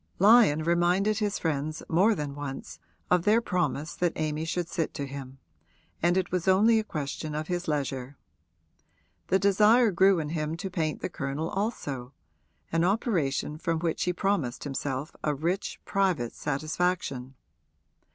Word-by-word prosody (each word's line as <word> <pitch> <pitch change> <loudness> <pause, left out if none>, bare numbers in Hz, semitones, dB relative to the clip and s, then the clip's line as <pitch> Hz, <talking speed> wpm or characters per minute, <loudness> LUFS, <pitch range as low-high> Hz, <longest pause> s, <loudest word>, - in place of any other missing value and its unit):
Lyon 200 -7 +6
reminded 175 +5 +2
his 205 -2 0
friends 155 -1 -2
more 195 +7 +4
than 145 -4 -4
once 140 -1 -7 0.3
of 180 -1 +5
their 210 +5 +4
promise 180 -7 -1
that 175 -2 0
Amy 155 0 -2
should 170 +1 -2
sit 165 -2 -3
to 145 - -3
him, 135 -1 -8 0.6
and 175 +2 +3
it 185 -2 -1
was 180 0 -1
only 215 +4 +5
a - - -1
question 150 -3 -4
of 155 +2 -4
his 175 0 -2
leisure. 135 -3 -2 1.1
The 190 - +3
desire 210 +4 +5
grew 190 +1 +4
in 155 -2 -2
him 155 0 -2
to 190 +2 -5
paint 160 -3 -2
the - - -2
Colonel 140 +3 -3
also 145 - -3 0.6
an 165 0 +2
operation 170 - 0
from 165 0 0
which 165 -1 -1
he 180 - +2
promised 175 -9 -1
himself 135 0 -3
a 150 -1 +1
rich 170 +7 -2
private 185 - 0
satisfaction. 145 -3 -2
165 Hz, 150 wpm, -28 LUFS, 145-190 Hz, 1.1 s, Lyon